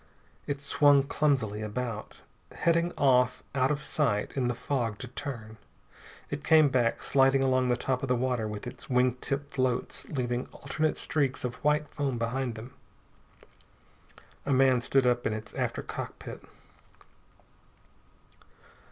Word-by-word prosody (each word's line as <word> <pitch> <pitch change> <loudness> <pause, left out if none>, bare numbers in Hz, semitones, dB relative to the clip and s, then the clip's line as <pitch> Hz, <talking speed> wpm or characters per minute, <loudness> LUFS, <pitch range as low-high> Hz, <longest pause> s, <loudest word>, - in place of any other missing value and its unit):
It 140 -1 -2
swung 145 -1 +5
clumsily 130 -8 0
about, 110 0 -5 0.3
heading 170 +1 +2
off 125 -2 +3
out 130 -1 +2
of 150 -1 -1
sight 115 -9 0
in 130 -3 +1
the 120 - -1
fog 120 -6 -2
to 130 - -7
turn. 115 -4 -7 0.7
It 145 - -4
came 155 -2 +6
back, 120 -3 +1
sliding 135 0 +4
along 130 -1 +2
the 125 -1 +2
top 130 +1 -1
of 135 - -2
the 125 - +3
water 125 -3 0
with 105 +2 -6
its 125 - -9
wing 125 -1 +3
tip 140 +1 -3
floats 130 -2 -1
leaving 125 -3 -2
alternate 155 +2 -2
streaks 140 -4 0
of 125 -1 -5
white 150 +1 +2
foam 140 -4 -2
behind 120 +1 -2
them. 115 +3 -9 1.7
A - - -2
man 130 -2 +4
stood 135 +2 +2
up 120 -1 +2
in - - -1
its 110 0 -6
after - - -2
cockpit. - - -7
130 Hz, 145 wpm, -29 LUFS, 120-140 Hz, 1.7 s, came